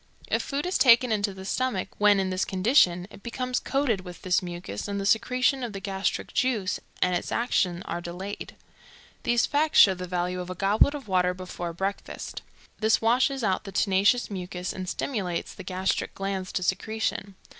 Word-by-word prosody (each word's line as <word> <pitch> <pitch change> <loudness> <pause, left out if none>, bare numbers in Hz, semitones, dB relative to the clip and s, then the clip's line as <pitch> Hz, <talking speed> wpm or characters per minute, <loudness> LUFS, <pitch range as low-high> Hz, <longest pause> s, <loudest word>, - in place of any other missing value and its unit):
If - - +1
food 285 +2 -3
is 360 - 0
taken 245 -1 +6
into 205 -1 +1
the 190 0 -9
stomach 250 -2 -1
when 205 -1 +5
in 190 -1 0
this 185 +1 0
condition, 185 -3 +3
it - - -13
becomes 250 +2 -2
coated 270 -8 0
with 180 -1 -11
this 185 -1 +2
mucus, 175 - -6
and 200 0 -3
the 195 - -3
secretion 250 +5 +2
of 235 -3 -4
the 195 - -5
gastric 195 0 -2
juice 225 -8 0 0.2
and 180 0 +2
its - - -3
action 185 -7 0
are 175 - -4
delayed. 180 +4 -6 0.7
These 240 -1 +2
facts 300 +1 +1
show 195 - +8
the 180 0 -6
value 180 0 -2
of 180 0 -6
a 185 - -4
goblet 210 - +3
of 275 -6 -8
water 180 -1 +2
before 180 -2 -5
breakfast. 195 +4 -4 0.4
This 220 0 +3
washes 255 +3 +2
out 190 -3 +1
the 195 - -8
tenacious 200 +5 +2
mucus, 180 -1 -4
and 185 -1 -5
stimulates 190 -10 -3
the - - -10
gastric 185 +1 -2
glands 195 -1 -3
to 185 - -1
secretion. 210 0 -2
195 Hz, 185 wpm, -26 LUFS, 185-235 Hz, 0.7 s, show